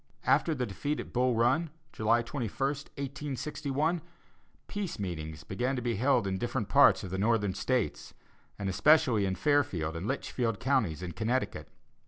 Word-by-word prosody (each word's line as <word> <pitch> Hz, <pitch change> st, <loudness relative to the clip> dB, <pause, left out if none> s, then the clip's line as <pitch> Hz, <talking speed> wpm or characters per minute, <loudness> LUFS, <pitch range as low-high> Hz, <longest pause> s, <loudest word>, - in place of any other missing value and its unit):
After 160 Hz, -, +3 dB
the 125 Hz, -2 st, -1 dB
defeat 120 Hz, +9 st, -3 dB
at -, -, -7 dB
Bull 125 Hz, 0 st, +2 dB
Run, 130 Hz, +9 st, +2 dB, 0.2 s
July 115 Hz, +2 st, +2 dB
21, 120 Hz, -2 st, -3 dB, 0.2 s
1861, 140 Hz, +3 st, -3 dB, 0.7 s
"peace 205 Hz, -4 st, -4 dB
meetings" 80 Hz, -6 st, -5 dB
began 125 Hz, -, -1 dB
to 125 Hz, -, -2 dB
be 120 Hz, -4 st, -1 dB
held 130 Hz, -1 st, +3 dB
in 95 Hz, -1 st, -2 dB
different 120 Hz, -1 st, -2 dB
parts -, -, +6 dB
of 90 Hz, -, -6 dB
the 95 Hz, -, -2 dB
Northern 105 Hz, -2 st, +2 dB
States, 125 Hz, +4 st, -2 dB, 0.4 s
and 100 Hz, -, -3 dB
especially 120 Hz, -, +4 dB
in 95 Hz, -, -1 dB
Fairfield 95 Hz, -, +1 dB
and 85 Hz, +5 st, -4 dB
Litchfield 120 Hz, -4 st, -2 dB
Counties, 115 Hz, -, +1 dB
in 90 Hz, -, -4 dB
Connecticut. 115 Hz, +8 st, -2 dB
120 Hz, 155 wpm, -30 LUFS, 100-140 Hz, 0.7 s, parts